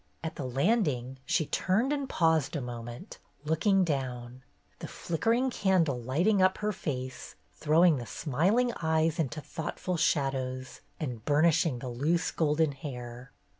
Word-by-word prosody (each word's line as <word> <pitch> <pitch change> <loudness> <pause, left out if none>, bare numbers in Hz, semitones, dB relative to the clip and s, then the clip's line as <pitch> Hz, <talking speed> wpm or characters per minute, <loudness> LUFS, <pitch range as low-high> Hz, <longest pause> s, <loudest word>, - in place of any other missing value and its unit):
At 160 - -3
the 140 - -5
landing 135 - 0
she 155 - +2
turned 220 - +1
and 280 -2 -3
paused 160 -4 +2
a - - 0
moment, 120 - -8 0.3
looking 190 +5 +3
down, 130 -5 -3 0.4
the - - -6
flickering 230 +10 0
candle 170 - +1
lighting 175 - +2
up 185 0 +4
her 210 0 -1
face, 130 -8 -5 0.2
throwing 160 +1 +4
the 120 -2 -6
smiling 195 - +1
eyes 160 0 +1
into 155 0 -2
thoughtful 170 +3 -4
shadows 135 -5 -1 0.2
and 125 -8 -4
burnishing 150 -1 +3
the 125 +1 -6
loose 150 +8 0
golden 155 -1 +1
hair. 125 -2 -8
155 Hz, 135 wpm, -29 LUFS, 130-180 Hz, 0.4 s, up